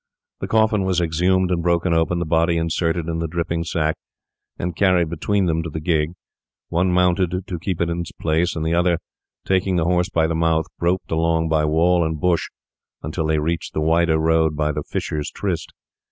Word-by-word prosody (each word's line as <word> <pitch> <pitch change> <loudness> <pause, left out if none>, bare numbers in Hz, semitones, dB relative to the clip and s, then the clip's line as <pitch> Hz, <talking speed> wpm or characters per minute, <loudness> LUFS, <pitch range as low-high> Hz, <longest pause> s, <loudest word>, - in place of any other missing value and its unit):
The - - -4
coffin 110 -2 +2
was 95 -2 +1
exhumed 90 +3 +1
and 85 -1 +1
broken 85 0 +1
open; 80 +1 +1
the 85 - -1
body 85 +1 +2
inserted 85 0 -1
in 80 0 -2
the 85 - -2
dripping 85 0 -2
sack 80 -1 -1 0.6
and 85 -1 -3
carried 90 -4 +3
between 95 +4 0
them 80 -1 0
to 85 - -5
the 80 - -5
gig; 80 0 0 0.6
one 90 +2 +1
mounted 90 0 +1
to 90 -4 -5
keep 90 0 -3
it 85 - +1
in 85 0 -2
its 85 - -5
place, 80 +2 0
and 80 -1 -3
the 80 - 0
other, 85 0 +2 0.5
taking 95 0 +1
the 85 -2 +1
horse 90 +1 +1
by 80 -4 +1
the 80 - -1
mouth, 80 -1 +1
groped 90 +2 -1
along 80 0 +1
by 80 -1 +2
wall 85 +3 +3
and 80 -1 -2
bush 90 +1 +1 0.5
until 80 +1 -2
they 80 0 +2
reached 80 +2 -2
the - - +1
wider 80 +1 +3
road 80 -1 +2
by 75 0 0
the 75 0 -3
Fisher's 75 +1 -3
Tryst. 90 -6 -3
85 Hz, 200 wpm, -21 LUFS, 80-90 Hz, 0.6 s, carried